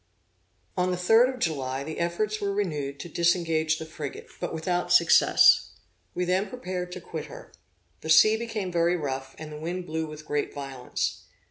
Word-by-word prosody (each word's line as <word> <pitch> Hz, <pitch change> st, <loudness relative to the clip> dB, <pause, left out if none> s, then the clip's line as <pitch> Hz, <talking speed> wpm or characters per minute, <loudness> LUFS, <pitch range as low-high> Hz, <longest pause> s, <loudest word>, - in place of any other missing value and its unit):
On 180 Hz, 0 st, +1 dB
the 180 Hz, -, -1 dB
3d 225 Hz, +8 st, +5 dB
of -, -, -12 dB
July, 135 Hz, -, -2 dB
the 155 Hz, +2 st, -6 dB
efforts 205 Hz, +6 st, -1 dB
were 200 Hz, -1 st, 0 dB
renewed 150 Hz, -9 st, -2 dB
to -, -, -7 dB
disengage 165 Hz, -2 st, +1 dB
the 160 Hz, -, -6 dB
frigate, 155 Hz, -3 st, -7 dB
but -, -, -3 dB
without 175 Hz, +2 st, -2 dB
success. 170 Hz, -1 st, +5 dB, 0.4 s
We 180 Hz, -, 0 dB
then 185 Hz, +3 st, 0 dB
prepared 180 Hz, -7 st, -5 dB
to -, -, -7 dB
quit -, -, -6 dB
her. -, -, -12 dB, 0.5 s
The 160 Hz, -, -8 dB
sea 160 Hz, +8 st, +7 dB
became 220 Hz, -5 st, -4 dB
very 170 Hz, 0 st, +2 dB
rough, 135 Hz, -3 st, -4 dB
and 155 Hz, -1 st, -8 dB
the 150 Hz, -, -7 dB
wind 175 Hz, +3 st, -4 dB
blew 160 Hz, 0 st, -3 dB
with 155 Hz, 0 st, -10 dB
great 145 Hz, -1 st, -2 dB
violence. 135 Hz, -3 st, -4 dB
170 Hz, 175 wpm, -27 LUFS, 155-185 Hz, 0.5 s, sea